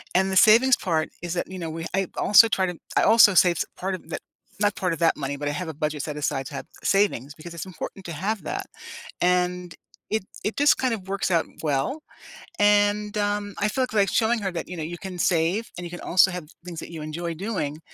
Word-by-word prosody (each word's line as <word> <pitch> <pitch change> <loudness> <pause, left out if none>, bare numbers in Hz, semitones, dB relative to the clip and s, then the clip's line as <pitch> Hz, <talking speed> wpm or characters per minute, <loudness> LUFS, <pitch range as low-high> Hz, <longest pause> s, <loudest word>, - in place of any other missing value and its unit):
And 190 +1 +3
the - - -1
savings 235 +6 +7
part 160 -4 -1
is 175 -1 -4
that, 175 - -2
you 190 - -6
know, 165 - -4
we 165 +1 -5
I 195 -1 0
also 210 +2 +7
try 190 -2 +1
to 180 -2 -5 0.2
I - - +4
also 225 -3 +7
saves 175 -2 +4
part 190 +1 -2
of 185 - -13
that - - -4 0.4
not 205 -1 +2
part 180 -2 -1
of 165 - -6
that 165 - +3
money, 140 0 -3
but 145 - -4
I - - 0
have 165 +3 -4
a - - -5
budget 150 0 -3
set 150 -2 -5
aside 135 -2 -1
to - - -8
have - - -6 0.2
savings 195 - +1
because 170 +2 -10
it's 170 - -6
important 185 +2 -8
to 170 - -5
have 200 +7 -2
that, - - -4 0.5
and 180 -1 +1 0.4
it 220 -2 -1 0.2
it 215 - -2
just 290 +1 +5
kind 255 -3 0
of 195 -4 -6
works 195 -1 -1
out 165 -2 +2 0.2
well, 150 - -1 0.6
and, 205 0 +3
um, 205 -1 -1
I 205 - +2
feel 260 +4 0
like 200 -2 +3
showing 230 +1 +2
her 195 -2 -2
that, 170 - -5
you 180 - -6
know, 160 - -3
you 170 +2 -5
can 190 -2 -7
save 175 +6 +1
and 175 - -6
you - - -6
can 175 - -7
also 185 +2 +4
have 180 -3 -6 0.2
things 170 -2 -6
that - - -8
you 160 -2 -7
enjoy 165 +2 -4
doing, 165 -6 -3
180 Hz, 240 wpm, -24 LUFS, 165-205 Hz, 0.6 s, savings